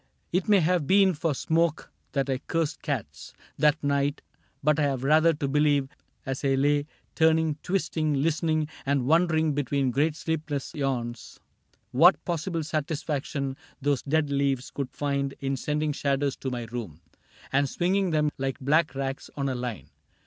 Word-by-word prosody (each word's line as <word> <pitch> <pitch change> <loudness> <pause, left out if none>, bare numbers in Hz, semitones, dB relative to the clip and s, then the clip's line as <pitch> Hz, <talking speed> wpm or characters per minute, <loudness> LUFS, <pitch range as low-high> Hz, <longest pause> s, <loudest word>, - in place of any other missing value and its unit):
.\A' - - +4
It 190 - -2
may 200 -3 +6
have 170 -3 +1
been 195 +1 +5
for 155 -1 -1
smoke 165 +2 0 0.2
that 135 -1 0
I 130 -2 -1
cursed 160 +1 -2
cats 75 - -5 0.2
That 150 0 +3
night, 140 0 0 0.4
but 150 +1 +3
I - - +3
have 135 -3 0
rather 155 +4 +5
to 145 -2 -2
believe 145 -1 +2 0.4
As 135 +1 -4
I 135 -1 +3
lay 145 +2 +2 0.3
turning, 160 -1 +2
twisting, 160 -5 0
listening. 155 +1 +1 0.2
And 140 -2 +1
wondering, 160 0 +3
between 140 -1 0
great 150 +5 +1
sleepless 155 -4 -3
yawns, 120 - -3 0.5
What - - +5
possible 170 0 -2
satisfaction 150 -3 -2 0.2
those 140 -2 +1
dead 150 0 0
leaves 140 -2 0
Could 140 -3 -4
find 140 -1 -2
in 135 0 -1
sending 150 +3 -1
shadows 140 -1 0
to 135 - -4
my 125 -2 -3
room 115 -6 -6
CAPTAIN 80 - -24
CRAIG - - -26
13 135 - +3
And 140 -1 +1
swinging 185 +4 +1
them 150 -2 +1
like 135 +1 -2
black 150 +3 +2
rags 135 0 -4
on 140 -1 0
a - - -1
line. 125 -3 -5
145 Hz, 170 wpm, -27 LUFS, 135-160 Hz, 0.5 s, may